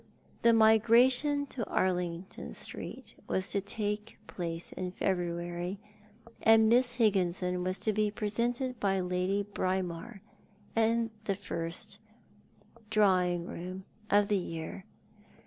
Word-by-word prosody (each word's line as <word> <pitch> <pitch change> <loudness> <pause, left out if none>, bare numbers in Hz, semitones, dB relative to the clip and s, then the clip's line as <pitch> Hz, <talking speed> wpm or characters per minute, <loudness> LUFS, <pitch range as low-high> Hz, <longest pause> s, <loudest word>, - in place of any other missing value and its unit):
The 235 - +6
migration 235 +6 +5
to 240 - -3
Arlington 180 -1 -2
Street - - -5
was 190 +1 0
to 200 - +2
take 210 +1 -3
place 170 -1 -4
in 180 -1 -4
February, 175 0 -2 0.6
and 225 0 +6
]Miss 245 +1 +4
Higginson 180 -5 +1
was 185 +1 -2
to 215 - +2
be 210 0 +1
pre 210 0 -3
sented 245 +2 -1
by 195 -2 +1
Lady 180 +2 0
Braemar 190 +1 -3 0.5
at 225 0 +2 0.2
the 195 - 0
first 185 +4 -3 0.9
drawing 185 -5 +3
room 185 +2 -7 0.2
of 205 0 +4
the 205 -2 +2
year. 165 +2 -6
195 Hz, 115 wpm, -31 LUFS, 180-220 Hz, 0.9 s, The